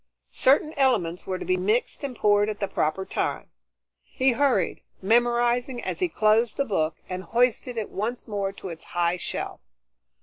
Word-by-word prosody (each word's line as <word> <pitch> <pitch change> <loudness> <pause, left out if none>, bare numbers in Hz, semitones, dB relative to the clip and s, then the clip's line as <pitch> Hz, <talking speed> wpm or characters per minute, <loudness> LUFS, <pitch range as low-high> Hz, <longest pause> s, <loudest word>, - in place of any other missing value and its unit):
Certain 290 +4 +3
elements 210 -11 +1
were 185 -1 -1
to - - -6
be 185 - +1
mixed 215 +10 0
and 270 -3 -4
poured 205 -1 +3
at 210 - -4
the 200 - -1
proper 190 +4 -1
time. - - -3 0.5
He 260 0 +1
hurried, 245 - +1 0.2
memorizing 240 +3 +2
as - - -3
he 365 -2 +1
closed 215 -1 +2
the 275 - +1
book, 160 - 0
and 185 0 -4
hoisted 240 +3 0
it 220 - -3
once 235 +6 -3
more 200 -2 -2
to 195 -1 -8
its 165 -1 -8
high 175 +1 +2
shelf. - - -4
215 Hz, 170 wpm, -25 LUFS, 190-245 Hz, 0.5 s, Certain